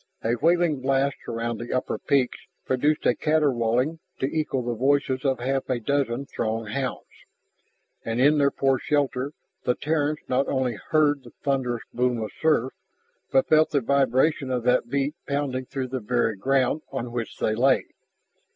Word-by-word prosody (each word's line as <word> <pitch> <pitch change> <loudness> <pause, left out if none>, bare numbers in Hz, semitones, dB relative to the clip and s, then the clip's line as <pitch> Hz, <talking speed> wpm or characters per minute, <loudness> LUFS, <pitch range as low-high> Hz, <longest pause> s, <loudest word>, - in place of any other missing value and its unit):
A 115 - +1
wailing 165 +1 +2
blast 135 +1 +1
around 115 0 -3
the 120 - -6
upper 130 - -1
peaks 135 -3 +1 0.3
produced 145 +4 +1
a - - +5
caterwauling 140 -1 +1 0.2
to - - -1
equal 140 -3 -1
the 120 0 -2
voices 130 +2 +1
of 135 -2 +1
half 135 +2 -1
a 125 -2 0
dozen 135 +1 -1
Throg 115 -4 -3
hounds. 130 +3 -3 1.0
And 115 +1 -2
in 145 +3 +5
their 140 -1 +4
poor 135 -2 +1
shelter 140 -1 0 0.3
the 125 - +1
Terrans 150 -1 0
not 130 +2 +1
only 130 -3 0 0.2
heard 150 -2 +3
the 120 - -14
thunderous 130 -4 0
boom 125 -1 +1
of 110 -1 -4
surf, 150 -5 +2 0.6
but 135 - +3
felt 155 0 +5
the 145 -2 +1
vibration 135 +2 +2
of 125 -2 -1
that 125 -1 +2
beat 140 +2 0
pounding 140 -2 -1
through 130 0 -4
the 130 +1 -2
very 115 -1 0
ground 135 +7 +1
on 125 -3 -4
which 120 -2 -4
they 110 - 0
lay. 130 +4 +3
130 Hz, 165 wpm, -25 LUFS, 120-140 Hz, 1.0 s, a